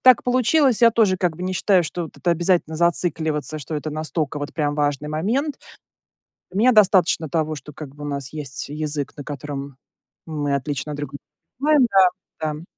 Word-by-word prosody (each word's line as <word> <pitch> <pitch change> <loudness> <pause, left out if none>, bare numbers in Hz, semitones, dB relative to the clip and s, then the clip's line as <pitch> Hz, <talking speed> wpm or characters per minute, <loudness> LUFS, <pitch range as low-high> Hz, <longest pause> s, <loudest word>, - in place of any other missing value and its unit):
так 255 -1 +6
получилось. 255 0 +3
Я 230 - +8
тоже 215 -5 +3
как 175 -4 0
бы 180 - -7
не 185 +1 -2
считаю, 185 -1 +3
что 170 +2 -4
вот 160 - -12
это 175 - 0
обязательно 170 -1 +1
зацикливаться, 160 -4 0
что 155 +1 -6
это 150 +1 -4
настолько 155 -1 -2
вот 145 0 -5
прям 145 -2 0
важный 145 0 -1
момент. 235 - -1 1.0
У - - -7
меня 245 +5 +5
достаточно 190 -6 +4
того, 155 0 -1
что 145 +2 -10
как 140 -1 -9
бы 145 0 -9
у - - -4
нас 140 -2 -4
есть 145 -4 -5
язык, 150 -1 -3
на 145 - -7
котором 140 -1 -6 0.5
мы 145 -3 -1
отлично 140 +2 -3
друг 145 -1 -5
друга 140 - -8 0.4
понимаем. 295 -3 +4 0.5
Да, 155 -1 -1
да. 155 +2 -9
155 Hz, 190 wpm, -22 LUFS, 145-185 Hz, 1.0 s, Я